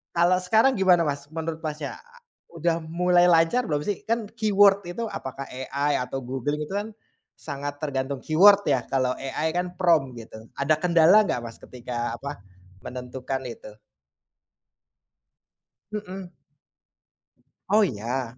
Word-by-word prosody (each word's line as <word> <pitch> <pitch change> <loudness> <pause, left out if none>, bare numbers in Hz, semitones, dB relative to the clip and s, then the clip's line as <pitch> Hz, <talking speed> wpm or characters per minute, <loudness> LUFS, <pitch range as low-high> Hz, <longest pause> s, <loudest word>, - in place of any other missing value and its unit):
kalau 175 +2 +4
sekarang 220 +8 +3
gimana, 180 -3 +5
Mas, 140 0 -4
menurut, 160 0 -4
Masnya? 150 -2 -5 0.5
Udah 170 0 0
mulai 175 +2 +3
lancar 170 +9 +4
belum 150 -1 -1
sih? 205 - -2
Kan 230 -2 0
keyword 205 -3 +4
itu 225 +6 -4
apakah 135 -6 -6
AI 140 +3 -2
atau 135 +1 -5
Google 135 +3 -2
itu 150 +4 -5
kan 205 +2 -3 0.5
sangat 145 -1 -6
tergantung 135 -1 -2
keyword 200 +6 +6
ya, 130 -4 +2
kalau 130 -1 0
AI 150 +4 -2
kan 180 0 -2
prompt 155 -8 +2
gitu. 110 0 -12
Ada 145 +3 +3
kendala 175 +4 +5
nggak, 140 - -1
Mas, 115 -1 -8
ketika 120 -2 -5
apa, 140 -5 -6 0.4
menentukan 130 +1 -5
itu? 105 -3 -10 2.2
Mhm. 190 -3 -6 1.4
Oh 215 +2 +5
ya? 120 - -3
155 Hz, 130 wpm, -25 LUFS, 130-180 Hz, 2.2 s, keyword